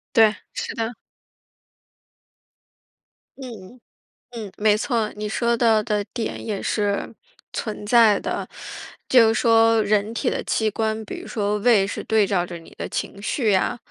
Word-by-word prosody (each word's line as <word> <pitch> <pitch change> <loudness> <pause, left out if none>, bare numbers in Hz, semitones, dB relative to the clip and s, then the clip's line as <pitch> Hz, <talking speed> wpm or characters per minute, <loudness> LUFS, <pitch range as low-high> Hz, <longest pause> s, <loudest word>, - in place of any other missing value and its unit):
对， 220 -2 +6 0.2
是 475 -1 -4
的。 225 0 -2 2.5
嗯， 240 -3 -10 0.5
嗯， 220 -5 -7
没 210 0 +4
错。 225 -1 -1
你 210 0 -4
说 235 +2 +1
到 225 -2 +3
的 210 -1 -1
点 230 -3 -4
也 210 -3 -3
是 205 -2 -1 0.4
存 210 -2 -4
在 220 -2 +5
的。 - - -4 0.6
就 240 -3 +6
是 225 - +2
说 225 -1 +4
人 210 +1 +1
体 - - 0
的 - - -3
器 220 - 0
官， 220 +1 -2
比 - - -6
如 - - -11
说 210 -2 -1
胃 210 -3 +4
是 205 - -5
对 220 -2 +3
照 190 -3 +1
着 175 -1 -7
你 165 - -15
的 - - -5
情 200 - -4
绪 220 +1 0
呀， 200 +5 +1
220 Hz, 165 characters per minute, -23 LUFS, 205-230 Hz, 2.5 s, 对